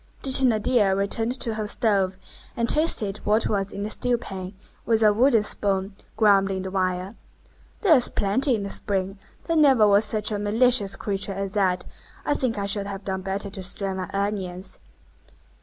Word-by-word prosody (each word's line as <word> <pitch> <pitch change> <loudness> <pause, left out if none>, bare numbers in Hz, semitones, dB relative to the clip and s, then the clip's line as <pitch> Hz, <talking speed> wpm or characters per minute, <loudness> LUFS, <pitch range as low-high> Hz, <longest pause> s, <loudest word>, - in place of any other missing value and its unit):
The 270 - 0
Thénardier 225 -5 +3
returned 225 +5 -1
to 230 - -2
her 215 -1 -4
stove, 195 -4 0 0.4
and 235 0 0
tasted 225 -11 +2
what 215 +2 +1
was 200 -2 -1
in 200 - -5
the 215 - -4
stewpan, 200 -7 -3 0.3
with 225 -1 +1
a 210 -1 +5
wooden 235 0 +3
spoon, 195 -1 -1 0.2
grumbling 195 -3 +2
the 190 - -6
while:— 185 +1 -2 0.7
"There's 315 - +4
plenty 240 +6 +1
in 205 - -4
the 200 - -5
spring. 195 0 -3 0.3
There 330 - -1
never 270 -8 +5
was 205 +1 +4
such 210 0 0
a 205 - -2
malicious 210 0 +2
creature 200 -1 -4
as 195 0 -4
that. 190 -3 0 0.4
I - - +1
think 250 -6 0
I 200 - -2
should 200 0 -1
have 195 0 -7
done 190 -1 -3
better 195 +1 -4
to 190 - -7
strain 190 +1 -3
my 185 - -5
onions." 195 -2 -4
205 Hz, 175 wpm, -24 LUFS, 195-225 Hz, 0.7 s, a